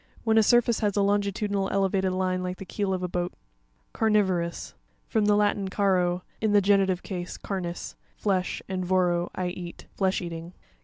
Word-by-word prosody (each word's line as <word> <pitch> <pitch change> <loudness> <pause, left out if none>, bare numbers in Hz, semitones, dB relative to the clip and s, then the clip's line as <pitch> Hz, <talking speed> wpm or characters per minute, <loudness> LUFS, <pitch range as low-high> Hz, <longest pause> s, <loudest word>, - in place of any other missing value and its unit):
When 225 -1 +4
a - - +7
surface 240 +1 +4
has 205 -2 0
a 200 - +4
longitudinal 200 0 0
elevated 195 -1 +1
line 185 0 0
like 180 0 -3
the 195 - -8
keel 200 0 -2
of 185 -1 -1
a - - 0
boat. 175 0 -2 0.6
Carn' 220 -1 +2
vorous.—From 185 +3 -2
the 210 0 +4
Latin, 205 -1 +1
caro, 185 -3 +1 0.2
in 215 -1 +2
the 205 - +7
genitive 195 -2 +2
case, 180 -2 -5
carnis, 180 -3 -5 0.2
flesh, 190 -3 -1
and 185 -1 -2
voro, 175 -1 +1
leat. 180 -1 -5
Flesh 190 -1 +1
eating. 170 0 -6
190 Hz, 165 wpm, -27 LUFS, 180-205 Hz, 0.6 s, a